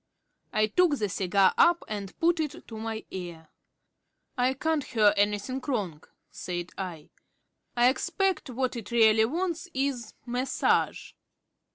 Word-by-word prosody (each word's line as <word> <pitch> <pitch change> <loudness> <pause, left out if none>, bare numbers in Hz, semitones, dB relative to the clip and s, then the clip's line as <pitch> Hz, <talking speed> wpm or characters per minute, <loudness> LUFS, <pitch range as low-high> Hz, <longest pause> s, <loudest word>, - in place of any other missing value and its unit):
I 215 - +3
took 300 - +2
the 210 - 0
cigar 190 0 +3
up 345 0 +5
and 200 -3 -6
put 340 +1 +2
it 310 +1 -4
to 225 - -8
my 225 0 -4
ear. 170 -4 -7 0.9
"I 255 +1 +1
can't 315 +1 0
hear 215 -5 +3
anything 205 +6 0
wrong," 195 - -2
I - - -21 0.2
said. 175 -1 -5
"I 175 -5 -6 0.7
expect 270 +9 +1
what 255 +1 -2
it 230 -3 -7
really 220 -2 +5
wants 340 +5 -2
is 265 -3 -2
massage." 250 +2 0
235 Hz, 135 wpm, -28 LUFS, 205-275 Hz, 0.9 s, up